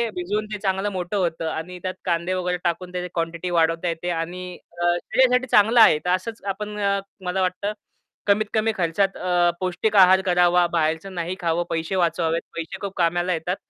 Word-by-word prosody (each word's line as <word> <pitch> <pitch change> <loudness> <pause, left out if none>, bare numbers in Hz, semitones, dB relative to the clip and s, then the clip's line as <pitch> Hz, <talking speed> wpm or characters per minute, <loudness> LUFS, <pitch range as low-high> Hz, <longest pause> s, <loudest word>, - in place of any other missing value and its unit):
भिजवून 205 +4 -2
ते 210 - -3
चांगलं 195 0 0
मोठं 185 +2 -3
होतं 165 -3 -1
आणि 180 +3 -6
त्यात 185 0 -2
कांदे 170 +1 0
वगैरे 180 -1 -1
टाकून 180 +1 -2
त्याची 180 0 -3
क्वांटिटी 170 +1 -3
वाढवता 165 +1 +2
येते 170 +1 -3
आणि 180 +2 -5 0.4
अ, - - +1
शरीरासाठी 255 +4 +2
चांगलं 225 +1 +5
आहे. 185 - +7
तर - - 0
असंच 200 +5 -1
आपण 210 +1 -6
अ, 200 -1 +1 0.3
मला 180 +1 -1
वाटतं, 185 +3 -1 0.5
कमीत 210 +2 +3
कमी 220 0 +2
खर्चात 190 +3 0
अ, 175 -1 +2
पौष्टिक 185 +4 -1
आहार 190 0 +7
करावा, 175 0 +4
बाहेरचं 160 +4 -1
नाही 175 +1 -3
खावं, 170 0 0
पैसे 165 +3 -2
वाचवावेत 165 -1 +1
पैसे 165 +2 -5
खूप 200 -1 -4
कामाला 175 +1 +1
येतात. 175 +3 -2
180 Hz, 180 wpm, -23 LUFS, 170-195 Hz, 0.5 s, आहे